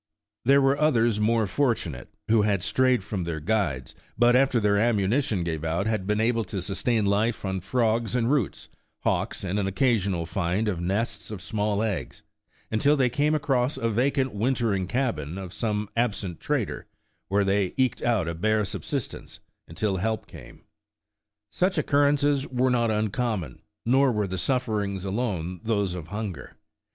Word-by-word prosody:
There 140 +2 +5
were 135 +2 +2
others 120 -8 +3
more 110 +1 +2
fortunate, 95 - -1 0.2
who 110 0 +4
had 100 -3 +1
strayed 130 -5 +2
from 95 -2 -3
their 85 -2 -3
guides, 80 -8 -1 0.2
but 120 +1 +5
after 130 -1 +4
their 100 -1 +2
ammunition 110 -1 +1
gave 80 -2 -3
out 85 +4 -1
had 110 -4 -1
been 105 0 +1
able 115 0 +2
to 95 +1 -4
sustain 105 +3 0
life 105 +3 +1
on 95 0 -1
frogs 115 +3 0
and 120 +1 +1
roots, 140 -9 -1 0.3
hawks - - -1
and 95 +2 -1
an 100 - 0
occasional 100 -6 +1
find 95 +4 -1
of 90 -5 -1
nests 105 +4 -2
of 105 -3 -6
small 105 +1 -1
eggs, 105 -6 -4 0.5
until 140 +7 +3
they 125 -3 +2
came 150 +4 +2
across 135 -3 0
a 115 0 0
vacant 130 +3 +1
wintering 110 -4 0
cabin 95 - -2
of 95 -2 -7
some 105 -2 -2
absent 105 -7 -1
trader, - - -2 0.4
where 100 +1 +2
they 95 -1 +1
eked 130 -2 +1
out 115 -8 +1
a 85 - -2
bare 110 +5 +1
sub - - -4
sistence - - -5 0.3
until 95 +4 -1
help 110 +4 -1
came. - - -13 0.9
Such 185 +1 0
occurrences 145 -1 +2
were 130 0 +1
not 120 -2 +2
uncommon, 110 -3 -1 0.2
nor 135 +3 +4
were 105 -3 0
the 95 -1 -3
sufferings 105 -7 -1
alone 95 -5 -2
those 100 -5 0
of 85 -3 -6
hunger. 100 -7 -6
110 Hz, 165 wpm, -26 LUFS, 95-125 Hz, 0.9 s, There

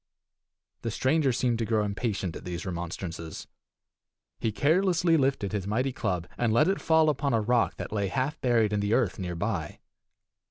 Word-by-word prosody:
The 115 - -2
stranger 135 +5 +2
seemed 120 -1 0
to 115 - 0
grow 110 -1 +1
impatient 100 -4 -2
at - - -8
these 85 -2 -5
remonstrances. 85 -2 -5 0.9
He 110 - 0
carelessly 170 - +3
lifted 135 -9 +1
his 100 -3 -3
mighty 125 +6 0
club, 90 -8 -2
and 120 -2 +2
let 135 +8 +4
it 195 +1 0
fall 160 -1 +4
upon 140 -4 +1
a - - +3
rock 120 +2 +2
that - - -6
lay 100 -2 0
half 130 +9 -2
buried 115 -4 +2
in 105 - +1
the 100 +2 +1
earth 105 -8 0
near 90 -2 -3
by. 90 -4 -3
115 Hz, 175 wpm, -28 LUFS, 95-135 Hz, 0.9 s, let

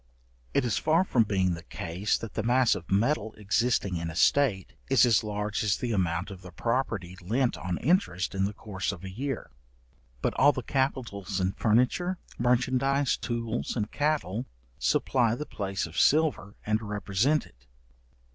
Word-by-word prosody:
It - - +3
is 120 - 0
far 165 +3 +3
from 120 -11 +2
being 95 -3 +1
the 85 - -6
case, 90 +3 -2
that 115 -3 -8
the - - -1
mass 120 +2 +3
of 85 - -6
metal 110 +2 +1
existing 105 -2 +1
in 85 0 -3
a 80 - -7
state, 110 -3 +2 0.2
is - - +6
as 115 -4 +3
large 105 0 -2
as 105 -2 +2
the 120 - -3
amount 90 -2 0
of 95 -2 -9
the 90 -1 -11
property 110 -4 -2
lent 120 +8 0
on 90 -2 -3
interest 130 - +1
in 95 0 +1
the 100 - -3
course 95 -3 -3
of 95 -2 -9
a 95 - -6
year; 135 - -4 0.7
but - - +1
all 145 +2 +6
the 130 - -4
capitals 115 -9 -2
in 95 0 +1
furniture, 125 - +1 0.2
merchandize, 130 +3 +2
tools, 115 -1 -3
and 105 -3 -2
cattle, 145 -7 -1 0.3
supply 120 -4 +2
the 150 - -5
place 100 -6 -3
of 80 +2 -4
silver 150 -10 +2
and 110 +1 +1
represent 105 +7 0
it. 60 +3 -22
110 Hz, 170 wpm, -28 LUFS, 95-130 Hz, 0.7 s, is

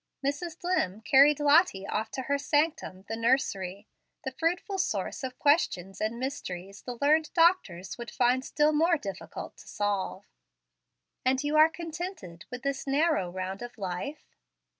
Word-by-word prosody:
Mrs. 310 +4 -2
Dlimm 220 - -1
carried 285 +1 +6
Lottie 295 - +4
off 220 +2 -2
to 260 - -3
her 280 +2 0
sanctum, 290 - 0
the 225 - -3
nursery, 210 -5 0 0.4
the 265 - -3
fruitful 355 +7 -1
source 215 - -2
of 255 -1 -5
questions 195 - +1
and 220 +2 -1
mysteries 195 -8 -5
the 245 -1 -6
learned 305 +2 +3
doctors 290 - +2
would 235 - -6
find 250 +1 +2
still 300 +2 +2
more 330 +3 +3
difficult 195 -8 -7
to - - -15
solve. 200 -1 -2 1.0
"And 260 +2 +2
you 295 +1 0
are 310 +1 +7
contented 330 - -7
with 250 0 -7
this 275 0 -2
narrow 280 - +2
round 185 +2 -5
of 240 0 -8
life?" 195 - -6
265 Hz, 150 wpm, -29 LUFS, 200-305 Hz, 1.0 s, are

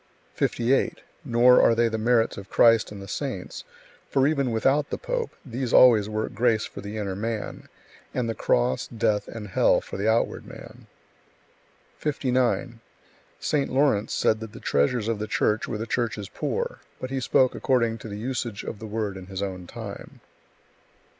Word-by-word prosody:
58. 120 +3 +1 0.2
Nor 125 -2 +5
are 115 - +5
they 115 0 +3
the 110 -1 -2
merits 115 0 +2
of 100 0 -9
Christ 115 -2 +4
and 105 - -8
the - - -10
Saints, 125 -3 -5 0.5
for 135 -1 +3
even 140 -3 +1
without 135 +6 +1
the - - -3
pope, - - -2 0.2
these 125 -1 -3
always 110 -5 +7
work 110 0 -3
grace 110 0 +2
for - - -9
the 105 +2 -6
inner 100 -3 -3
man, 110 +1 -4 0.4
and 125 -2 -1
the 115 - -1
cross, 65 - +1
death, 110 -3 0
and 110 -3 -7
hell - - +3
for - - -8
the 105 +3 +1
outward 115 +1 0
man. - - -12 1.1
59. 130 -4 0 0.6
St. 145 -2 0
Lawrence 130 -6 +2
said 110 - +2
that 110 -2 -8
the - - -9
treasures 105 - +1
of 115 -2 -1
the 110 - -3
Church 105 +1 +1
were 110 - -3
the 110 - -4
Church's 115 -4 -2
poor, - - -3 0.2
but 130 - -5
he 135 - -1
spoke 130 0 +3
according 115 -3 +1
to 110 - -9
the 100 - -6
usage 120 -2 -3
of 105 - -6
the 110 - -7
word 105 -2 -3
in 90 -1 -10
his 95 0 -4
own 90 -2 -5
time. - - -9
115 Hz, 175 wpm, -25 LUFS, 105-125 Hz, 1.1 s, always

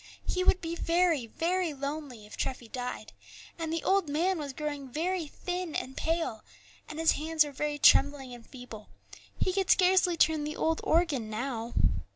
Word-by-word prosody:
He 365 - 0
would 370 - +3
be 330 0 -4
very, 335 -6 +1
very 340 +4 -1
lonely 280 -5 -5
if 210 - -11
Treffy 255 -3 -4
died; 250 +2 -6 0.5
and 325 -1 -3
the 330 0 -2
old 385 -5 +2
man 345 +5 +1
was 285 -2 -4
growing 290 -1 -5
very 340 +3 -1
thin 360 +1 -4
and 265 - -3
pale, 325 -10 -1 0.5
and 305 - -7
his 325 0 +4
hands 315 +1 +2
were 295 - -7
very 295 +1 -2
trembling 275 -2 +4
and 240 -1 -11
feeble; 245 -5 -11 0.5
he 370 - 0
could 385 -1 0
scarcely 365 -2 +4
turn 315 -1 +3
the 300 +1 -4
old 320 0 0
organ 310 -9 +1
now. 230 +1 -4
305 Hz, 175 wpm, -29 LUFS, 265-340 Hz, 0.5 s, his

